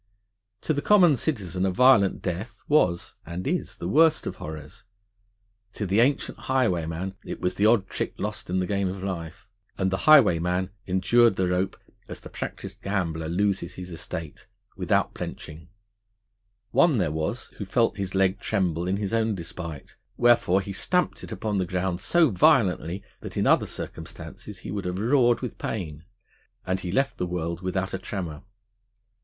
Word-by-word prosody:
To 155 - 0
the 145 - -1
common 180 -6 +6
citizen 95 - -2
a 95 - +3
violent 100 -1 +4
death 100 +5 -4
was 90 - +2
(and 85 +2 -6
is) 175 +5 -2
the - - -4
worst 160 0 +4
of - - -4
horrors; 80 +5 -9 0.9
to 105 - -3
the 100 +3 +2
ancient 130 +4 +1
highwayman 95 -8 0
it - - -6
was 90 0 0
the 100 +3 +3
odd 110 -4 +3
trick - - -4
lost - - -4
in 90 - 0
the 90 - 0
game 100 0 0
of 95 0 -6
life. 85 -3 -5 0.3
And 95 -1 0
the 95 - -3
highwayman 90 - +5 0.2
endured 95 +5 +4
the 95 -1 +1
rope, 90 +1 0 0.3
as - - -7
the - - -12
practised - - -6
gambler 85 -5 -2
loses 90 -1 0
his 90 -1 -8
estate, 80 -2 -7 0.3
without - - +1
blenching. 80 0 -7 1.0
One 165 -7 +4
there 90 -7 +1
was, 80 +10 -3
who 100 - -3
felt 115 +4 +1
his 95 -1 -3
leg 95 0 +2
tremble 90 -5 -1
in 95 +2 0
his 100 0 -3
own 110 -2 +1
despite: 85 -4 -7 0.2
wherefore 120 -6 +4
he 100 +1 -6
stamped 180 - 0
it - - -8
upon 105 -3 -2
the 90 - -1
ground 90 0 -2
so 170 -6 +3
violently, 95 -2 +3 0.2
that - - -8
in - - +1
other - - +4
circumstances 105 -2 -8
he - - -4
would 100 -2 -4
have 90 0 -2
roared 120 +2 +3
with 125 - -6
pain, 80 -7 -4 0.6
and 95 +1 0
he 90 -2 -4
left 135 +6 0
the 90 - -1
world 85 -1 -3
without 95 0 -2
a 95 - -2
tremor. 90 -6 -5
95 Hz, 170 wpm, -26 LUFS, 90-110 Hz, 1.0 s, common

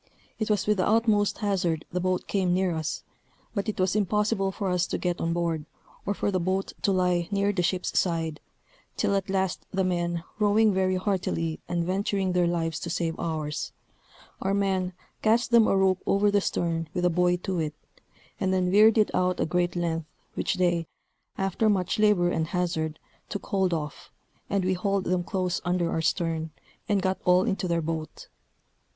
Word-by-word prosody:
It 220 - -1
was 210 -2 +1
with 210 -1 +2
the 185 - +1
utmost 215 -2 +3
hazard 180 -6 0
the 180 - -1
boat 185 0 0
came 185 -3 +1
near 185 -1 +1
us; 160 -1 -3 0.5
but 200 +1 -2
it 210 - -4
was 185 +1 +2
impossible 210 -1 +1
for 195 -1 -2
us 180 0 +1
to - - -2
get 175 -1 -2
on 165 - 0
board, 165 -3 -1 0.4
or 200 - 0
for 205 - 0
the 185 - +1
boat 185 +2 -1
to 200 - +2
lie 180 -2 +1
near 200 0 +1
the 185 - 0
ship's 180 +1 0
side, 165 -3 -1 0.6
till - - +1
at 195 0 -1
last 190 -1 0
the 190 0 0
men 175 -2 -1 0.2
rowing 210 0 +4
very 185 0 +1
heartily, 185 -4 -1
and 170 -1 0
venturing 190 +1 0
their 180 -1 +3
lives 165 -1 -1
to 170 - -5
save 165 -1 -1
ours, 155 -2 -3 0.7
our 195 +1 +1
men 190 -2 0 0.3
cast 230 +3 +2
them 235 -2 +6
a 195 - +3
rope 190 -1 +3
over 205 +1 +3
the 205 0 +3
stern 165 -3 -1
with 180 - +1
a 180 - +4
buoy 180 +1 +2
to 180 0 -3
it, 150 -2 -2 0.6
and 190 - +1
then 185 -1 +1
veered 215 +3 +6
it 215 - +3
out 180 0 +1
a - - +2
great 175 +2 0
length, 165 -2 -1 0.3
which - - -1
they, 175 -2 +1 0.5
after 195 +3 +1
much 195 +1 0
labor 205 -5 +4
and 160 -2 0
hazard, 160 -3 -1 0.3
took 200 - -5
hold 190 -2 +1
of, 150 -3 -4 0.4
and 200 -2 0
we 185 - +2
hauled 195 +1 0
them 180 -1 0
close 185 -1 -1
under 175 -1 0
our 165 - 0
stern, 160 -1 0 0.4
and 200 -3 +2
got 190 0 0
all 180 +1 +5
into 190 -1 -1
their 170 -1 0
boat. 160 -1 -5
185 Hz, 190 wpm, -27 LUFS, 170-195 Hz, 0.7 s, them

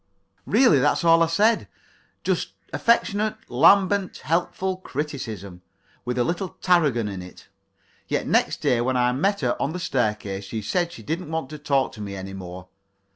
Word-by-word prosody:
Really, 240 - +5
that's 145 +5 +2
all 165 0 +5
I 165 - +4
said 210 +7 +2 0.6
just - - -1 0.2
affectionate, 215 -2 +2
lambent, 195 +8 +4
helpful 185 +3 -1
criticism, 120 - -6 0.4
with 125 0 -2
a 120 - +3
little 175 +6 -2
Tarragon 150 - +2
in 95 -2 -5
it. 90 0 -13 0.6
Yet - - -1
next - - +1
day 120 -2 +2
when 130 +1 0
I 125 0 +3
met 195 +10 0
her 125 -3 +1
on 140 - -1
the 180 - -4
staircase 105 - -1
she 110 +2 -5
said 170 - 0
she 175 - -11
didn't 165 +1 -4
want 160 -4 -3
to 150 - -7
talk 140 -2 +1
to 105 - -10
me 100 -1 -5
any 95 0 -7
more. 90 -1 -8
140 Hz, 170 wpm, -24 LUFS, 110-175 Hz, 0.6 s, Really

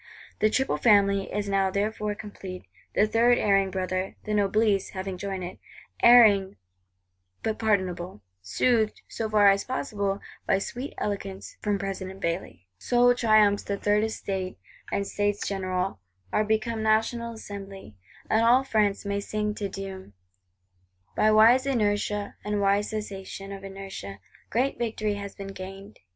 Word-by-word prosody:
The 215 - +4
"Triple 265 +5 0
Family" 200 -3 +3
is 205 0 -2
now 195 -1 +2
therefore 210 +1 -1
complete; 195 -3 -8 0.3
the 210 - +5
third 235 +3 +4
erring 195 -2 +3
brother, 185 0 -2
the 210 - -3
Noblesse, 205 -1 +2
having 190 0 -3
joined 190 0 -4
it;—erring 200 +2 +3 0.9
but 220 -1 -2
pardonable; 185 - -1 0.2
soothed, 220 - +1
so 220 -1 -4
far 205 -2 +6
as 195 0 0
possible, 205 -6 -2 0.3
by 195 - +3
sweet 245 +7 -5
eloquence 195 -2 -4
from 205 -1 0
President 195 -1 -5
Bailly. 170 - -4
So 245 - +4
triumphs 215 -4 +4
the 200 - -3
Third 205 +1 +2
Estate; 195 -4 -3 0.3
and 200 - 0
States 205 0 -1
General 185 - -2 0.3
are 215 - +3
become 220 +1 -1
National 225 +2 +1
Assembly; 195 - -9 0.3
and 220 +1 +2
all 245 +3 +5
France 210 -6 +1
may 200 0 -1
sing 210 +1 -2
Te 210 -1 -3
Deum. 190 - -8 1.0
By 215 - +4
wise 235 +5 +6
inertia, 210 -4 0
and 210 0 -1
wise 200 +1 +2
cessation 195 -2 -6
of 195 0 -8
inertia, 195 - -8 0.3
great 255 +4 0
victory 220 -3 -1
has 200 -1 -7
been 195 0 -7
gained. 195 +2 -9
205 Hz, 140 wpm, -26 LUFS, 195-215 Hz, 1.0 s, far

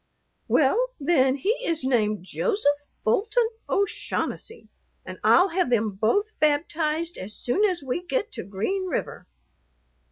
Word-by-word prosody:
"Well, 405 - +3
then, 275 -4 +3
he 285 +10 0
is 330 - -1
named 215 -7 +1
Joseph 290 - 0 0.2
Bolton 450 - +2 0.2
O'Shaughnessy, 400 +3 -2 0.4
and - - -8
I'll 370 +3 +5
have 360 -4 0
them 225 -3 +2
both 230 - +1
baptized 310 +2 0
as 195 +3 -6
soon 310 +12 0
as 360 -7 -1
we 270 +6 -3
get 430 +4 -2
to - - -6
Green 295 - -2
River." - - -4
310 Hz, 130 wpm, -25 LUFS, 255-395 Hz, 0.4 s, I'll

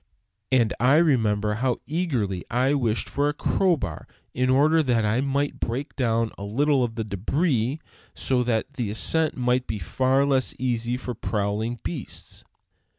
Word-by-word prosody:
And 120 -4 +3
I 130 +4 +4
remember 110 -10 +2
how 130 -2 +1
eagerly 130 - -1
I 130 +4 +2
wished 120 -6 0
for 145 +1 0
a 150 - -3
crowbar 145 - 0 0.3
in 125 +1 0
order 150 +5 +4
that 120 -6 +1
I 110 +4 +1
might 140 +1 -1
break 130 +6 -3
down 115 -4 0
a - - -6
little 135 +6 +2
of 115 -2 -3
the 110 -2 -3
débris, 125 - 0 0.4
so 130 -2 0
that 120 +2 -1
the 120 -6 -3
ascent 155 +9 +1
might 125 0 +1
be 110 - -3 0.2
less 135 0 +2
easy 120 -1 -1
for 125 -1 -5
prowling 110 +1 -2
beasts. 85 -1 -6
125 Hz, 155 wpm, -25 LUFS, 110-140 Hz, 0.4 s, I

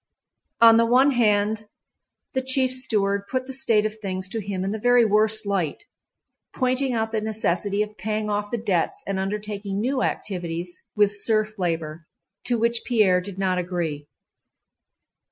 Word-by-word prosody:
On 230 -1 +8
the 230 - +4
one 260 +4 +5
hand, 215 -3 +1 0.7
the 260 - 0
chief 260 0 +1
steward 205 -6 0
put 255 -1 -1
the 265 - -6
state 225 -5 +2
of 215 0 -4
things 190 -2 -2
to 225 +2 -3
him 190 -2 -3
in 195 - -2
the 220 - -3
very 245 +1 +5
worst 215 +1 +2
light, 195 - -1 0.7
pointing 255 +1 +1
out 220 -1 -1
the 220 -1 -1
necessity 210 -2 0
of 210 -2 -10
paying 215 +2 -2
off 205 0 -2
the 240 - -2
debts 200 -7 -1
and 195 -1 -2
undertaking 200 0 -3
new 255 +4 0
activities 175 -4 -3
with 205 -1 +3
serf 215 0 -1
labor, 165 -2 -3 0.4
to 240 - +2
which 235 +1 +1
Pierre 205 -7 +3
did 190 0 -8
not 185 -2 0
agree. 170 -5 -3
210 Hz, 160 wpm, -24 LUFS, 190-230 Hz, 0.7 s, On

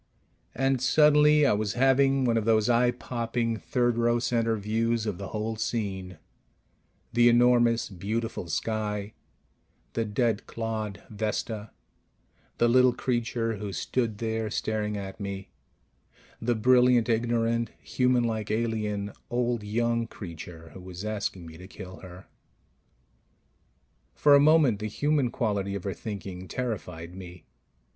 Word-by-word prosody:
And 135 -1 +1
suddenly 150 +2 +5
I 135 - +4
was 105 -1 -1
having 135 +1 +3
one 120 -2 +2
of 115 - +1
those 110 -2 +3
eye 120 +1 +4
popping 115 -1 -2
third 120 0 0
row 120 0 +3
center 115 -1 +1
views 115 +2 0
of 105 -5 -3
the 100 - -5
whole 110 +2 -3
scene: 100 -5 -3 1.0
the 120 0 +6
enormous, 120 -1 +4
beautiful 105 +1 -4
sky; 105 +1 -2 0.8
the 115 - 0
dead 110 0 -1
clod, 110 -3 -4
Vesta; 110 0 -3 0.9
the 120 - +3
little 125 +1 +5
creature 115 -2 -1
who 100 0 -5
stood 110 +5 -2
there 110 0 -2
staring 105 0 -2
at 95 0 -7
me 100 -1 -6 0.9
the 120 +1 +1
brilliant 125 0 +4
ignorant, 115 0 +1
humanlike 120 -4 0
alien, 105 -2 -1 0.2
old 120 -1 0
young 115 +2 0
creature 85 -4 -9
who 95 - -10
was 90 +2 -8
asking 100 -4 -3
me 80 0 -11
to 90 - -10
kill 95 -2 -10
her. 95 0 -12 1.9
For 145 - +5
a 140 - +8
moment 145 -7 +5
the 110 - -3
human 145 +3 +1
quality 100 -4 -1
of 100 - -5
her 100 - -2
thinking 95 -4 -7
terrified 90 -9 -5
me 90 -2 -11
115 Hz, 130 wpm, -27 LUFS, 100-120 Hz, 1.9 s, a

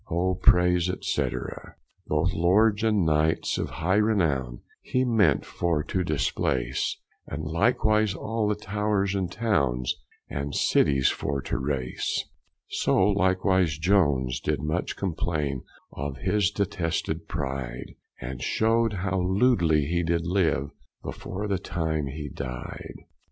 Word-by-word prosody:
O 90 +3 +1
praise, 90 -1 +4
&c. - - 0 0.8
Both - - +1
lords 105 +5 +3
and 105 -5 +2
knights 80 0 +1
of - - -2
hye 95 +5 0
renowne 80 - +1 0.2
He 130 0 0
ment 105 - +3
for 85 -4 -1
to 95 +4 -1
displace, 70 -5 -1 0.3
And 75 +2 -5
likewise 105 - +2
all 110 +1 -1
the 105 - +1
towers 105 -1 -1
and 95 -3 -1
townes 70 - 0 0.3
And 70 0 -4
cities 70 -2 +3
for 70 0 -2
to - - -2
race; 65 -2 -2 0.4
So - - +1
likewise 95 -4 +2
Jones 75 -8 +2
did - - -1
much 75 +4 -2
complaine 75 -7 -2 0.3
Of 70 -1 -4
his 105 +2 +1
detested 85 -3 -2
pride, 65 -5 -4 0.3
And 65 +1 -6
shewed 115 +6 +2
how 95 -1 0
lewdly 90 - +3
he 85 +4 0
did 85 0 0
live 85 -6 +1 0.3
Before 100 +3 -5
the 100 -3 0
time 80 -6 -2
he 75 +2 -5
died. 65 -3 -7
85 Hz, 125 wpm, -26 LUFS, 70-100 Hz, 0.8 s, praise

